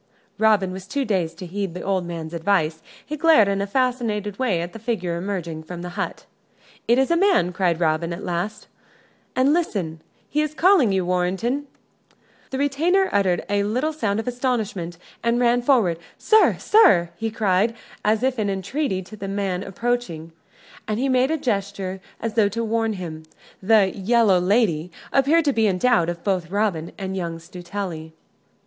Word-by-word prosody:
Robin 210 -4 +3
was 190 +1 -8
too 275 +4 -1
dazed 185 -6 -1
to 185 - -7
heed 190 0 -4
the 180 - -6
old 190 -3 -1
man's 165 -1 -6
advice. 165 -2 0 0.2
He 305 - -4
glared 305 -9 +5
in 200 0 0
a 200 - -2
fascinated 220 -4 -1
way 225 -10 +1
at 175 +1 -6
the 225 - -8
figure 205 -7 -2
emerging 170 -3 -4
from 175 +2 -8
the 180 - -5
hut. 200 +3 -5 0.6
"It 235 - +4
is 265 +4 +2
a - - +4
man," 355 - +3
cried 175 -2 +1
Robin, 165 0 +1
at 170 - -6
last, 180 +5 -3 0.7
"and 260 +3 +3
listen 185 - -2 0.3
he 300 - 0
is 305 0 -2
calling 345 - +4
you, 190 -2 +1
Warrenton." 190 +10 -1 0.8
The 265 - -4
retainer 325 +8 +2
uttered 190 -3 +1
a 205 0 +1
little 250 +10 -1
sound 220 -9 -1
of 225 - -5
astonishment 220 -9 -2 0.2
and 235 +1 +1
ran 245 0 +3
forward. 230 - +2 0.2
"Sir 435 0 +4
sir," 180 - +4
he 225 0 -3
cried, 215 0 +1 0.3
as 215 +2 +2
if 260 -2 0
in 205 -2 0
entreaty, 195 +2 -2
to 215 - -11
the 200 -2 -6
man 195 -2 -2
approaching: 195 -6 -3 0.6
and 215 -1 -1
he 265 +3 0
made 255 +1 +3
a 320 - +1
gesture 200 -6 -3 0.2
as 225 -1 -3
though 215 -2 +3
to 230 +3 -3
warn 225 0 0
him. 170 -5 -6 0.4
The 200 -1 +4
"Yellow 205 -1 +3
Lady" 180 -4 +1 0.2
appeared 295 +4 +4
to 285 - +2
be 225 -2 +2
in 190 -2 +1
doubt 240 -6 +3 0.2
both 190 -4 0
of 165 - -18
Robin 200 -6 -1
and 190 -1 -4
young 170 -3 -3
Stuteley. 175 -1 -7
200 Hz, 180 wpm, -23 LUFS, 180-245 Hz, 0.8 s, glared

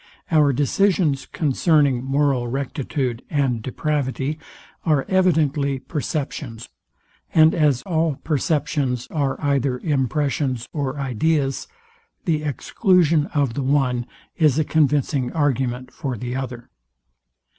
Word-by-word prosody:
Our 150 -3 +5
decisions 150 +1 +1
concerning 145 -3 +2
moral 135 -2 +1
rectitude 135 -1 -3
and 135 -6 0
depravity 140 +3 -2 0.4
are 150 -5 +2
evidently 155 -7 +2
perceptions; 135 -4 -4 0.7
and 160 0 +6
as 145 -6 +2
all 160 -4 0
perceptions 145 -4 0
are 140 -4 -1
either 140 -3 +1
impressions 135 -2 -1
or 140 -3 -2
ideas, 135 +2 0 0.6
the 155 -3 +1
exclusion 165 - +2
of 140 -5 +1
the 140 - -2
one 130 -3 +1 0.3
is 155 -5 +3
a 155 - +3
convincing 145 -4 +1
argument 130 -4 -1
for 135 -6 -4
the 125 +3 -4
other. 125 -2 -6
140 Hz, 105 wpm, -22 LUFS, 130-155 Hz, 0.7 s, and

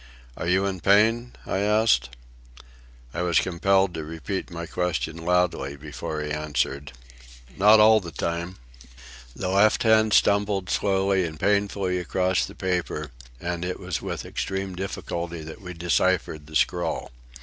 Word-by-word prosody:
"Are - - -5
you 95 +2 +2
in 95 -2 -2
pain?" 110 +6 +3
I 95 - -1
asked. 105 - +3 1.0
I 85 - -2
was 90 -2 +2
compelled 95 +1 +2
to 80 -2 -4
repeat 80 +6 -5
my 85 -1 -6
question 85 -2 -2
loudly 85 -5 0
before 75 +1 -5
he 75 - -5
answered: 70 -2 -2 0.6
"Not 105 +3 +6
all 110 +1 +7
the 90 -5 -8
time." 85 +4 -3 0.8
The 90 - -3
left 100 +3 +4
hand 110 -1 +4
stumbled 100 -2 +2
slowly 95 -1 +1
and 80 -3 -5
painfully 100 -2 +1
across 90 +1 0
the - - -12
paper, 90 -6 -2 0.3
and 90 0 -3
it 90 0 -3
was 90 -4 -4
with - - -5
extreme 95 -1 -3
difficulty 85 -3 -5
that 80 +4 -10
we 90 -2 -8
deciphered 85 -2 0
the 80 - -10
scrawl. 85 +2 0
90 Hz, 145 wpm, -25 LUFS, 80-100 Hz, 1.0 s, all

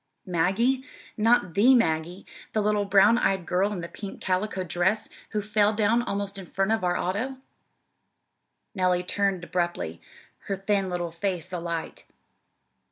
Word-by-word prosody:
"Maggie? 195 +10 +1 0.3
Not 215 -5 +3
the 240 +9 +6
Maggie, 170 -3 0 0.3
the 215 - +1
little 210 -1 +1
brown 200 +4 +5
eyed 190 -2 +1
girl 190 +4 +1
in 190 -4 -4
the 170 - -5
pink 195 +4 -8
calico 190 +1 -1
dress, 180 +5 0 0.2
who 210 -1 -2
fell 210 0 +2
down 220 +2 +2
almost 200 -3 -3
in 185 - -9
front 195 +4 0
of 225 -3 +1
our 180 0 +1
auto!" 225 +9 -2 1.4
Nellie 180 -2 +1
turned 195 -1 0
abruptly, 175 - -2 0.5
her 195 - 0
thin 195 0 0
little 175 -1 -3
face 180 0 -3
alight. 170 -2 -4
195 Hz, 145 wpm, -26 LUFS, 180-210 Hz, 1.4 s, the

